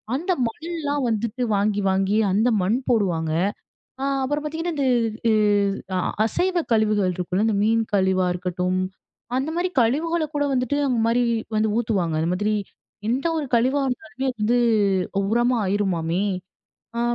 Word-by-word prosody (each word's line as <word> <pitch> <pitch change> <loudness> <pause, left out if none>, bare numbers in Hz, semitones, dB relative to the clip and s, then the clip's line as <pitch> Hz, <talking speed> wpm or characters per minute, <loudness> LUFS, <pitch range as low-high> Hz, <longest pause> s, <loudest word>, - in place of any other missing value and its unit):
அந்த 350 +7 -1 0.2
மண் 260 +8 -8
எல்லா 295 -3 -2 0.2
வந்துட்டு 225 +3 -2
வாங்கி, 205 0 +1
வாங்கி 195 +2 +1
அந்த 220 +5 +3
மண் 210 +7 +1
போடுவாங்க. 175 -9 +1 0.7
அ - - -1 0.2
அப்புறம் 290 +3 -1
பார்த்தீங்கன்னா, 325 +3 -3
இந்த 275 - +1 0.4
இ - - +4 0.6
அ - - +1 0.3
அசைவ 360 - 0
கழிவுகள் 210 -4 +2
இருக்குல்ல, 185 +4 -1
இந்த 220 - +1
மீன் 225 +1 +3
கழிவா 190 -1 +2
இருக்கட்டும், 180 +1 -1 0.6
அந்த 275 +4 -1
மாரி 360 +1 0
கழிவுகளை 310 +7 +1
கூட 290 - +1
வந்துட்டு 255 +2 0
அந்த 245 -3 +1
மாரி 240 +1 +2 0.3
வந்து 215 0 +2
ஊத்துவாங்க. 190 -9 0
அந்த 165 - 0
மாதிரி, 205 +3 0 0.6
எந்த 260 +5 -1
ஒரு 295 - -2
கழிவா 260 +5 +2
இருந்தாலுமே 265 0 -4
வந்து 235 +3 +3 0.7
உரமா 240 +2 +2
ஆயிருமாமே? 185 -2 0 0.8
ஆ. - - +1
225 Hz, 145 wpm, -23 LUFS, 190-270 Hz, 0.8 s, இ